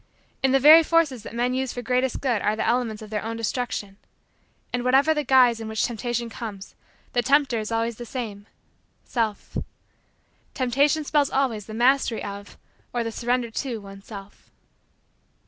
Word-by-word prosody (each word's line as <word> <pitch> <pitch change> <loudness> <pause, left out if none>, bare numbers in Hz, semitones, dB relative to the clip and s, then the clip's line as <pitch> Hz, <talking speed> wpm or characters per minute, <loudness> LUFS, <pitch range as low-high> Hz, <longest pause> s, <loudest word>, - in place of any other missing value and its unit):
In 265 - +3
the 270 - +4
very 305 +4 +9
forces 320 -7 +2
that 230 - -9
men 245 +1 0
use 260 0 -2
for 245 - -6
greatest 250 +1 0
good 245 -6 0
are 210 - +1
the 220 - -2
elements 230 -3 0
of 215 - -11
their 210 -1 -1
own 225 +1 -4
destruction. 225 -3 -3 0.8
And, 245 0 -1
whatever 270 +5 +4
the 300 -1 -1
guise 250 -3 +5
in 225 - -6
which 220 0 0
Temptation 240 0 -3
comes, 215 -4 -8 0.4
the 245 - +3
tempter 275 -2 +2
is 215 +1 -5
always 230 0 -1
the 240 - -7
same 215 -5 -6 0.6
Self. 225 -4 -2 1.0
Temptation 280 +4 +2
spells 290 -1 +2
always 240 -7 -1
the 215 - -7
mastery 245 0 +2
of 200 0 -8 0.3
or 240 -1 -1
the 230 - -3
surrender 240 0 -1
to 245 0 -3
one's 195 -1 -12
self. 200 -2 -11
240 Hz, 170 wpm, -24 LUFS, 220-265 Hz, 1.0 s, very